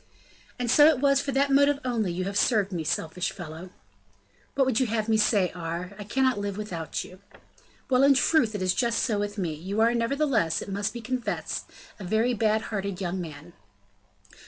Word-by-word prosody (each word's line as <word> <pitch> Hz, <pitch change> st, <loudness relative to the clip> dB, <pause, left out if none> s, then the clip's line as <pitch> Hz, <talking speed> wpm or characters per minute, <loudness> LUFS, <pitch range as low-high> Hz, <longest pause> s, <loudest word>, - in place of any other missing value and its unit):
"And 245 Hz, -2 st, -1 dB
so 295 Hz, +3 st, +7 dB
it 315 Hz, -3 st, +4 dB
was 275 Hz, 0 st, +3 dB
for 280 Hz, -, -3 dB
that 275 Hz, +1 st, +2 dB
motive 280 Hz, +1 st, +4 dB
only 225 Hz, -7 st, 0 dB
you 180 Hz, +2 st, -3 dB
have 195 Hz, +2 st, -4 dB
served 205 Hz, -2 st, +2 dB
me; 170 Hz, -3 st, -3 dB
selfish 160 Hz, +4 st, -2 dB
fellow!" 175 Hz, 0 st, -9 dB, 0.9 s
"What 270 Hz, -, +3 dB
would 255 Hz, -4 st, +1 dB
you 260 Hz, -, +2 dB
have 220 Hz, -1 st, -1 dB
me 220 Hz, -, +3 dB
say, 205 Hz, -4 st, +2 dB
Aure? 175 Hz, +2 st, -5 dB
I -, -, -5 dB
cannot 260 Hz, +2 st, +1 dB
live 200 Hz, -1 st, -4 dB
without 175 Hz, -7 st, -4 dB
you." 185 Hz, -, -13 dB, 0.7 s
"Well! 255 Hz, -1 st, +3 dB
in 275 Hz, 0 st, +6 dB
truth, 255 Hz, -5 st, +2 dB
it 195 Hz, -, -2 dB
is 185 Hz, 0 st, +2 dB
just 235 Hz, -2 st, 0 dB
so 215 Hz, -5 st, 0 dB
with 205 Hz, +1 st, -3 dB
me; 175 Hz, -5 st, -2 dB
you 190 Hz, +7 st, -4 dB
are, 230 Hz, +2 st, +4 dB
nevertheless, 235 Hz, -, +1 dB
it -, -, -7 dB
must 200 Hz, +1 st, -2 dB
be 240 Hz, -, -7 dB
confessed, 250 Hz, +1 st, -3 dB, 0.3 s
a -, -, -7 dB
very 220 Hz, +6 st, +1 dB
bad 220 Hz, -1 st, +1 dB
hearted 200 Hz, -2 st, -3 dB
young 185 Hz, -1 st, -3 dB
man." 160 Hz, 0 st, -9 dB
210 Hz, 200 wpm, -26 LUFS, 185-250 Hz, 0.9 s, so